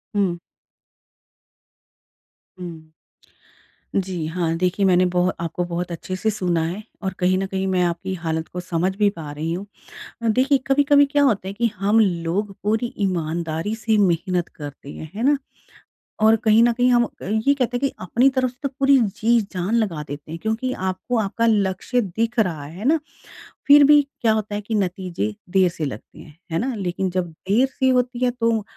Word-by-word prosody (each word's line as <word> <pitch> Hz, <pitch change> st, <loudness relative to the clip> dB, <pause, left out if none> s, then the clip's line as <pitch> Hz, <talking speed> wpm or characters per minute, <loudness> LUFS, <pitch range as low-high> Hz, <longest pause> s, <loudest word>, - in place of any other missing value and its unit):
हुँ। 190 Hz, -4 st, +1 dB, 2.2 s
हूँ। 165 Hz, -3 st, -9 dB, 1.1 s
जी 185 Hz, -4 st, -1 dB
हाँ। 165 Hz, 0 st, -1 dB
देखिए 185 Hz, +2 st, +1 dB
मैंने 185 Hz, 0 st, +4 dB
बोह 180 Hz, +1 st, +2 dB
आपको 170 Hz, +1 st, -2 dB
बहुत 175 Hz, 0 st, -4 dB
अच्छे 185 Hz, +2 st, -5 dB
से 220 Hz, +4 st, 0 dB
सुना 180 Hz, -5 st, 0 dB
है 180 Hz, +6 st, -4 dB, 0.2 s
और 190 Hz, -2 st, -2 dB
कहीं 185 Hz, +1 st, +2 dB
न 195 Hz, -, -1 dB
कहीं 190 Hz, 0 st, -2 dB
मैं 185 Hz, -1 st, +1 dB
आपकी 175 Hz, +2 st, -2 dB
हालत 160 Hz, -2 st, -3 dB
को 180 Hz, -, -6 dB
समझ 180 Hz, +1 st, -1 dB
भी 205 Hz, 0 st, +3 dB
पा 160 Hz, -7 st, -8 dB
रही 155 Hz, +3 st, -3 dB
हूँ। 185 Hz, +4 st, -4 dB, 0.6 s
अ, 230 Hz, -, +1 dB
देखिए 260 Hz, +5 st, +3 dB
कभी-कभी 285 Hz, +1 st, +5 dB
क्या 285 Hz, +1 st, +1 dB
होता 215 Hz, -9 st, +2 dB
है -, -, -4 dB
कि 235 Hz, +3 st, +1 dB
हम 205 Hz, +4 st, +3 dB
लोग 190 Hz, +1 st, 0 dB
पूरी 220 Hz, +4 st, 0 dB
ईमानदारी 170 Hz, 0 st, -1 dB
से 220 Hz, 0 st, 0 dB
मेहनत 180 Hz, -1 st, +1 dB
करते 145 Hz, -1 st, -9 dB
हैं, 155 Hz, -, -9 dB
है 220 Hz, -, -4 dB
ना? 285 Hz, +2 st, +3 dB, 0.8 s
और 220 Hz, +1 st, +6 dB
कहीं 220 Hz, 0 st, +5 dB
न 240 Hz, -, +4 dB
कहीं 245 Hz, +1 st, +2 dB
हम 240 Hz, -1 st, +5 dB
अ, -, -, -8 dB, 0.2 s
ये 220 Hz, +8 st, +2 dB
कहते 250 Hz, -3 st, -1 dB
हैं -, -, -4 dB
कि -, -, -15 dB
अपनी 240 Hz, +8 st, +3 dB
तरफ 260 Hz, -1 st, 0 dB
से 245 Hz, -, -20 dB
तो 280 Hz, -, 0 dB
पूरी 275 Hz, 0 st, +5 dB, 0.2 s
जी-जान 215 Hz, -3 st, +1 dB
लगा 190 Hz, -10 st, 0 dB
देते 145 Hz, +2 st, -8 dB
हैं 165 Hz, -, -6 dB
क्योंकि 225 Hz, +4 st, -1 dB, 0.2 s
आपको 190 Hz, +7 st, -3 dB
आपका 220 Hz, +2 st, 0 dB
लक्ष्य 205 Hz, +3 st, +1 dB
दिख 230 Hz, +4 st, -2 dB
रहा 170 Hz, -8 st, 0 dB
है 175 Hz, +9 st, -8 dB
ना। 315 Hz, +3 st, +4 dB, 0.7 s
फिर 285 Hz, 0 st, +9 dB
भी 295 Hz, +1 st, +7 dB, 0.2 s
क्या 225 Hz, -, +3 dB
होता 215 Hz, -1 st, -2 dB
है 210 Hz, -, -3 dB
कि 220 Hz, +2 st, -3 dB
नतीजे 180 Hz, -, -2 dB
देर 185 Hz, -1 st, +4 dB
से 165 Hz, -2 st, -4 dB
लगते 130 Hz, -6 st, -8 dB
हैं। 155 Hz, 0 st, -14 dB
है 165 Hz, -, 0 dB
ना? 255 Hz, +3 st, -1 dB
लेकिन 190 Hz, -1 st, -2 dB
जब 180 Hz, -1 st, -2 dB
देर 205 Hz, +10 st, +1 dB
सी 260 Hz, 0 st, 0 dB
होती 250 Hz, -1 st, +1 dB
है 245 Hz, -, +2 dB
तो 230 Hz, -3 st, 0 dB
195 Hz, 190 wpm, -22 LUFS, 175-230 Hz, 2.2 s, फिर